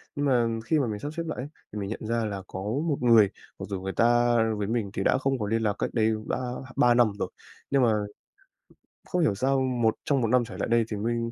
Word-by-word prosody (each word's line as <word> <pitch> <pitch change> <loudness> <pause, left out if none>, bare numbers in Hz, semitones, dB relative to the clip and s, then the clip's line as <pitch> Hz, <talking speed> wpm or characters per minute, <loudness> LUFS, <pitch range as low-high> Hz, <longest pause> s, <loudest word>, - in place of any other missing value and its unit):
Nhưng 145 - -1
mà 125 -4 +3 0.2
khi 155 +2 +2
mà 135 - +1
mình 105 -2 -4
sắp 145 +1 -5
xếp 170 +1 -3
lại 160 - -4
ấy, 135 - -4 0.3
thì 105 - -4
mình 100 0 -4
nhận 110 - -5
ra 115 -1 0
là 100 -2 -4
có 95 - -6
một 140 - -1
người 115 -5 +6 0.3
mặc - - -5
dù 95 -2 -3
người 95 0 -4
ta 120 0 +3 0.2
với 100 -1 -2
mình 110 -2 -1
thì - - -2
đã - - +3
không 135 -1 0
có 105 - -2
liên 115 +1 0
lạc 105 -2 +1
cách - - 0
đây 110 -1 +2 0.2
đã - - 0 0.4
3 120 -1 +5
năm 120 -3 +4
rồi. - - -2 0.4
Nhưng 140 -1 +3
mà 115 -3 +4 1.2
không 180 - +1
hiểu 110 -11 +2
sao 135 +6 +1
một 120 -4 +1
trong 140 -3 +2
1 115 - +1
năm 125 +1 +3
trở 115 - -9
lại - - -2
đây 115 -1 +3
thì 105 - -2
mình 115 +2 -1
115 Hz, 260 wpm, -27 LUFS, 110-130 Hz, 1.2 s, người